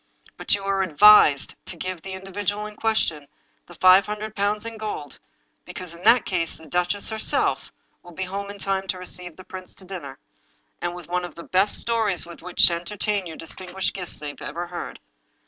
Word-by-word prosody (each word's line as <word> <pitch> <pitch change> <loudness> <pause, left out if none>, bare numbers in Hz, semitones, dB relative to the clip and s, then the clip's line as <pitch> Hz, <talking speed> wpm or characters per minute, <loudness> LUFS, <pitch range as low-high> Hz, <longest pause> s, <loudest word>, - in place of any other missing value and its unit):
But - - +2
you 200 - -6
are 195 0 +1
advised 185 -5 +7
to 180 - -6
give 185 0 -4
the 190 +2 -7
individual 205 +2 -3
in 210 0 -8
question 210 -11 0 0.4
the 175 - -13
five 185 +3 +6
hundred 210 +1 -5
pounds 210 +2 0
in 230 -1 -6
gold, 210 -10 -6 0.4
because 180 -2 -8
in 170 - -13
that 240 0 +6
case 170 -3 -1
the 160 - -11
duchess 180 +5 0
herself 220 0 0 0.3
will 175 - -13
be 190 +3 -4
home 200 +2 -4
in 200 - -7
time 195 -1 -1
to 185 - -1
receive 180 -2 -6
the 185 - -12
prince 185 -1 -9
to 190 - -12
dinner, 170 -8 -7 0.6
and 175 0 -2
with 180 -3 -9
one 180 +1 -1
of 175 - -7
the 170 - -9
best 190 +4 +2
stories 220 -7 +1
with 170 0 -11
which 180 - +4
to 175 - +5
entertain 195 +3 -2
your 160 - -8
distinguished 185 +3 -4
guests 180 -3 -4
they 145 -1 -5
ever 170 +5 -4
heard. 175 0 -7
185 Hz, 200 wpm, -24 LUFS, 175-205 Hz, 0.6 s, advised